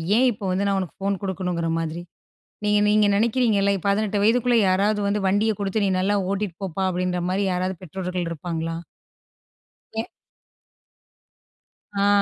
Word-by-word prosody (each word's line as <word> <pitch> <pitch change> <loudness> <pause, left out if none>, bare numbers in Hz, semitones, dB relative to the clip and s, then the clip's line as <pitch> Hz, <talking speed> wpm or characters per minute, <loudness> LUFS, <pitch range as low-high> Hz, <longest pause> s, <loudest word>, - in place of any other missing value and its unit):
ஏன் 255 +3 +5
இப்போ 210 -2 -7
வந்து 190 +2 0
நான் 200 -1 +1
உனக்கு 185 -4 -6
ஃபோன் 195 -1 0
குடுக்கணுங்ற 180 -3 -2
மாதிரி. 165 +1 -3 0.6
நீங்க 210 0 +3
நீங்க 210 0 +4
நெனைக்கிறீங்கல்ல 215 -2 +2
18 205 +1 +1
வயதுக்குள்ள 240 +2 +3
யாராவது 205 +3 +2
வந்து 205 +1 +1
வண்டிய 205 +3 +2
குடுத்து 200 +1 -1
நீ - - +2
நல்லா 200 +2 +1 0.2
ஓட்டிட்டு 200 -3 -2
போப்பா, 190 +1 -2
அப்டின்ற 180 0 -1
மாதிரி 190 +2 0
யாராவது 185 +1 -1
பெற்றோர்கள் 180 0 -4
இருப்பாங்களா? 165 0 -3 1.2
என். 225 +1 -2 2.0
ஆ. - - +4
195 Hz, 135 wpm, -23 LUFS, 180-210 Hz, 2.0 s, ஏன்